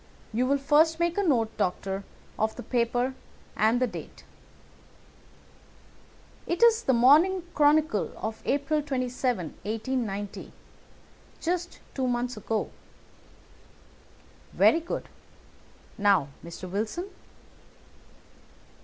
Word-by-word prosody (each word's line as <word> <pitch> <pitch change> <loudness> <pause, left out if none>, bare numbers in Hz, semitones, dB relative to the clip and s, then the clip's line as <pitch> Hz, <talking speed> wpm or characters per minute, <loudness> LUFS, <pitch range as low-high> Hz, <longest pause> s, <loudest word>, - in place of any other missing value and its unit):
You 250 +3 +1
will 280 +1 +3
first 310 +4 +3
make 340 0 +1
a 405 - +1
note, 240 - +1
Doctor, 190 +2 -2 0.4
of 220 0 0
the - - -7
paper 245 +1 0 0.4
and 220 +3 +3
the 255 - +3
date." 230 - -9 2.2
"It 345 +6 0
is 465 -1 +6
The 265 - +2
Morning 310 +10 +5
Chronicle 295 -6 +3
of 220 0 -5
April 285 +2 0
27, 255 - -1
1890. 215 -2 -3 0.9
Just 350 +1 -3
two 260 -2 -1
months 245 0 -1
ago." 215 +1 -2 1.8
"Very 330 - +5
good. 335 - -5 0.9
Now, 195 -8 +3
Mr. 170 +2 -8
Wilson?" 220 - -3
255 Hz, 100 wpm, -27 LUFS, 220-305 Hz, 2.2 s, is